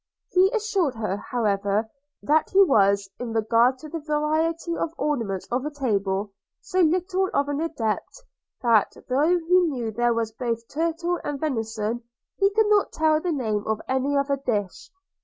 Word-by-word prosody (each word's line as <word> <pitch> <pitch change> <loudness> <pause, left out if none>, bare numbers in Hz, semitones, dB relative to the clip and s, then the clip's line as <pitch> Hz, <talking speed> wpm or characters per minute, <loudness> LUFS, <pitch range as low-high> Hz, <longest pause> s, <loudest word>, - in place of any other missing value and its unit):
He 375 +1 +5
assured 400 - 0
her, 210 -3 -2
however, 210 -4 -1 0.4
that 310 +1 +2
he 395 +1 +6
was, 200 - +3
in 240 -2 -4
regard 230 +3 +3
to 310 - -10
the 325 +2 -5
variety 315 +3 -1
of 330 0 -3
ornaments 225 -11 -2
of 250 +2 0
a 300 - -2
table, 205 -8 -1 0.3
so 370 - -3
little 365 +3 +2
of 280 - +2
an 290 +1 -1
adept, 320 - -3 0.4
that, 230 -4 +3
though 300 +8 +3
he 350 +2 +3
knew 255 -10 -1
there 240 +1 +1
was 225 -1 -1
both 230 0 -3
turtle 335 +3 -1
and 290 -1 -3
venison, 225 -5 -2 0.4
he 395 0 +4
could 435 +2 +2
not 415 -1 +3
tell 310 -1 +2
the 355 - -1
name 220 -8 -1
of 220 -1 0
any 265 +2 0
other 280 0 +1
dish. 210 -8 -3
275 Hz, 165 wpm, -24 LUFS, 225-330 Hz, 0.4 s, he